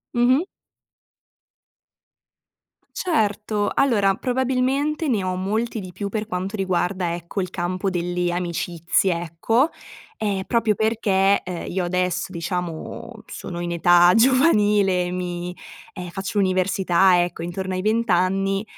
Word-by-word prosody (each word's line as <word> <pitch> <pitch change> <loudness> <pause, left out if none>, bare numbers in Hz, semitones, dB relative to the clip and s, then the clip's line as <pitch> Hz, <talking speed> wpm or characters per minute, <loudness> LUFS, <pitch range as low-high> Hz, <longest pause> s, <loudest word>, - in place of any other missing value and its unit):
Mh-mh. 255 +6 +4 2.5
Certo. 210 - 0
Allora, 210 -8 +3
probabilmente 260 - 0
ne 215 -7 +1
ho 185 0 -1
molti 220 +5 -2
di 185 -2 -8
più 200 +3 -5
per 215 0 -3
quanto 190 0 -3
riguarda, 185 -2 -1
ecco, 175 +3 -4
il 185 - -4
campo 185 +2 -2
delle 175 -1 -1
amicizie, 175 0 0
ecco, 200 - +1 0.5
ehm, 200 -3 -1
proprio 230 -3 +1
perché, 200 -3 +2
uhm, 180 -1 -5
io 180 -1 -1
adesso 180 +1 -1
diciamo 170 -1 -5
sono 170 - -7
in 175 0 -3
età 175 +1 +5
giovanile, 210 - +3
mi 180 0 -4 0.4
ehm, 180 -2 -7
faccio 195 +3 -4
università, 185 -1 +3
ecco, 175 -1 -5
intorno 185 +2 -4
ai 185 - -2
20 220 +1 +1
anni, 195 +2 +1
190 Hz, 120 wpm, -22 LUFS, 180-215 Hz, 2.5 s, età